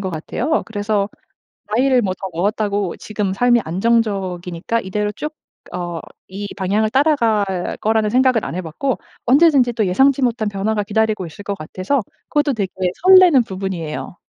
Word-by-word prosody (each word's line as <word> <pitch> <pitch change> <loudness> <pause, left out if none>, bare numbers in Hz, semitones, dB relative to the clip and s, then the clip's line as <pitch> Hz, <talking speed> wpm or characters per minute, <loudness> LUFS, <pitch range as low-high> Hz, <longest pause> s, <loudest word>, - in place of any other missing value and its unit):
것 190 - -3
같아요. 235 - -2
그래서 205 -2 -1 0.7
나이를 255 +1 +3
뭐 190 -4 -1
더 190 - -4
먹었다고 200 +1 -1
지금 210 -2 -3
삶이 240 +3 +3
안정적이니까 190 0 -1
이대로 210 +2 -2
쭉 300 +6 -5 0.4
어 175 -2 -4 0.3
이 200 +2 -5
방향을 205 +3 0
따라갈 220 - +1
거라는 220 0 +2
생각은 255 -1 +3
안 - - -5
해 185 - -2
봤고 185 - -3 0.3
언제든지 270 -2 +4
또 220 -2 0
예상치 265 +9 +3
못한 235 -3 0
변화가 205 +1 -1
기다리고 215 -1 0
있을 165 +5 -10
것 200 0 -4
같아서 185 - -2 0.3
그것도 295 -1 +1
되게 200 -5 -2 0.3
설레는 365 -8 +7
부분이에요. 185 -5 -5
210 Hz, 350 characters per minute, -19 LUFS, 190-245 Hz, 0.7 s, 설레는